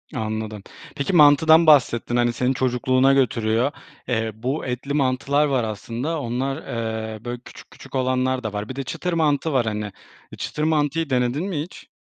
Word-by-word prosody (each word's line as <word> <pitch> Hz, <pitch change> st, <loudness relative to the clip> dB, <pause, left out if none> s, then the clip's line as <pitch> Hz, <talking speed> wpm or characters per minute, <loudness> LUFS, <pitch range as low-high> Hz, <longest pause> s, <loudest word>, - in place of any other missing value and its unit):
Anladım. 110 Hz, -1 st, -4 dB, 0.3 s
Peki, 140 Hz, +7 st, -2 dB
mantıdan 160 Hz, +1 st, +6 dB
bahsettin, 120 Hz, -5 st, +4 dB
hani, 120 Hz, -1 st, +2 dB
seni 125 Hz, +2 st, 0 dB
çocukluğuna 130 Hz, +1 st, +2 dB
götürüyor. 120 Hz, -1 st, +1 dB, 0.4 s
Eee, 110 Hz, -3 st, -1 dB
bu 130 Hz, +7 st, -3 dB
etli 130 Hz, +3 st, -4 dB
mantılar 140 Hz, +1 st, +1 dB
var 135 Hz, -4 st, +1 dB
aslında, 115 Hz, -, -4 dB
onlar, 130 Hz, +3 st, -2 dB
eee, 110 Hz, -4 st, -5 dB
böyle, 120 Hz, 0 st, -4 dB
küçük -, -, -14 dB
küçük 135 Hz, -, -12 dB
olanlar 130 Hz, 0 st, 0 dB
da 110 Hz, -2 st, -4 dB
var. 105 Hz, +1 st, -4 dB
Bir 130 Hz, -, -6 dB
de 135 Hz, -, -3 dB
çıtır 180 Hz, +7 st, -4 dB
mantı 155 Hz, -1 st, +1 dB
var 125 Hz, -3 st, +2 dB
hani. 105 Hz, -1 st, -3 dB, 0.4 s
E, -, -, -9 dB
çıtır 150 Hz, -, -4 dB
mantıyı 155 Hz, 0 st, +1 dB
denedin 125 Hz, +5 st, 0 dB
mi 155 Hz, -6 st, -2 dB
hiç? 170 Hz, +4 st, -10 dB
130 Hz, 170 wpm, -22 LUFS, 115-145 Hz, 0.4 s, mantıdan